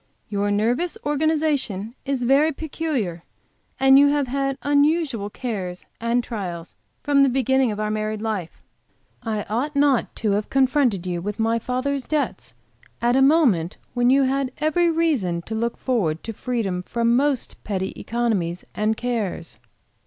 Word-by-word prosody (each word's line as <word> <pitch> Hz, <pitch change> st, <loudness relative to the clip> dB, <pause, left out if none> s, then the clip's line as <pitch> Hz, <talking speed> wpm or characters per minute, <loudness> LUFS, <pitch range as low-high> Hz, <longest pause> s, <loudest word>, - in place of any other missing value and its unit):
"Your 205 Hz, 0 st, 0 dB
nervous 235 Hz, +12 st, 0 dB
organization 290 Hz, -8 st, 0 dB
is 270 Hz, -3 st, -1 dB
very 280 Hz, +6 st, +4 dB
peculiar, 275 Hz, -, -3 dB, 0.6 s
and 270 Hz, +1 st, +7 dB
you 285 Hz, -, +6 dB
have 285 Hz, -1 st, +2 dB
had 275 Hz, +1 st, -1 dB
unusual 285 Hz, -6 st, +2 dB
cares 195 Hz, -7 st, -5 dB
and 235 Hz, +1 st, +1 dB
trials 180 Hz, -7 st, -6 dB, 0.3 s
from 285 Hz, -1 st, +3 dB
the 275 Hz, -, +5 dB
beginning 265 Hz, -1 st, +2 dB
of 210 Hz, -, -5 dB
our 215 Hz, 0 st, -1 dB
married 215 Hz, 0 st, -2 dB
life. 210 Hz, -6 st, -4 dB, 0.6 s
I 215 Hz, -2 st, -2 dB
ought 255 Hz, +8 st, -2 dB
not 280 Hz, -3 st, +2 dB
to 215 Hz, -3 st, 0 dB
have 205 Hz, +1 st, -1 dB
confronted 260 Hz, -, +2 dB
you 175 Hz, -1 st, -2 dB
with 205 Hz, +3 st, -4 dB
my 225 Hz, +1 st, +1 dB
father's 255 Hz, +3 st, -2 dB
debts 305 Hz, -2 st, -2 dB, 0.4 s
at 240 Hz, +1 st, +2 dB
a 270 Hz, -, +4 dB
moment 265 Hz, -, +3 dB, 0.2 s
when 245 Hz, 0 st, +2 dB
you 275 Hz, +1 st, +5 dB
had 270 Hz, 0 st, 0 dB
every 325 Hz, +3 st, +2 dB
reason 275 Hz, -, 0 dB
to 220 Hz, -, -6 dB
look 230 Hz, +1 st, -1 dB
forward 185 Hz, -, -1 dB
to 225 Hz, -, -5 dB
freedom 215 Hz, -6 st, -2 dB
from 235 Hz, +5 st, +1 dB
most 275 Hz, -1 st, 0 dB
petty 190 Hz, -2 st, -3 dB
economies 205 Hz, -8 st, -2 dB
and 215 Hz, +1 st, 0 dB
cares." 225 Hz, -8 st, -3 dB
240 Hz, 155 wpm, -23 LUFS, 210-280 Hz, 0.6 s, and